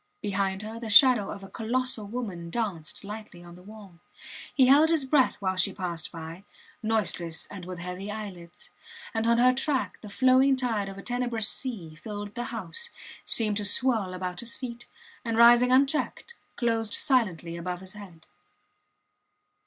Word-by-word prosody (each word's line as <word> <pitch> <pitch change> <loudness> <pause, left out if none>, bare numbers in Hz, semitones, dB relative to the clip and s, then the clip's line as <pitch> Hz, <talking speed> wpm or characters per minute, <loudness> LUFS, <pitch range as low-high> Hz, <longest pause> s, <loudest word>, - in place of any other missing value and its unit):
Behind 195 -1 -1
her 220 +2 -7
the 230 -1 -6
shadow 235 -1 +7
of 200 - -7
a - - -8
colossal 230 0 -2
woman 200 -7 -5
danced 190 -7 -3
lightly 205 -4 -9
on 175 0 -12
the 180 - -14
wall. 200 -3 -13 0.6
He 265 - +6
held 290 +5 +6
his 320 -4 +2
breath 265 -1 +3
while 190 -2 -2
she 185 +1 +2
passed 175 -4 -4
by, 165 +2 -8 0.4
noiseless 180 -7 0
and 185 -3 -8
with 180 0 -7
heavy 180 +3 -6
eyelids. 195 -5 -7 0.4
And 225 0 0
on 235 0 +4
her 250 +1 +5
track 265 +1 -1
the 210 - -9
flowing 260 +4 +4
tide 225 -6 -1
of 195 - -9
a 195 - -9
tenebrous 240 -3 0
sea 210 -14 -3
filled 205 +4 -7
the 240 +2 -4
house, 470 - -3 0.4
seemed 215 -3 +1
to 210 - -2
swirl 210 -4 +2
about 180 -1 -4
his 235 0 -6
feet, 240 -2 -7 0.4
and 230 -1 -2
rising 240 +2 +7
unchecked, 275 - +1 0.2
closed 225 -3 0
silently 190 - +1
above 180 +1 -5
his 190 0 -9
head. 185 -6 -12
210 Hz, 165 wpm, -27 LUFS, 185-245 Hz, 0.6 s, shadow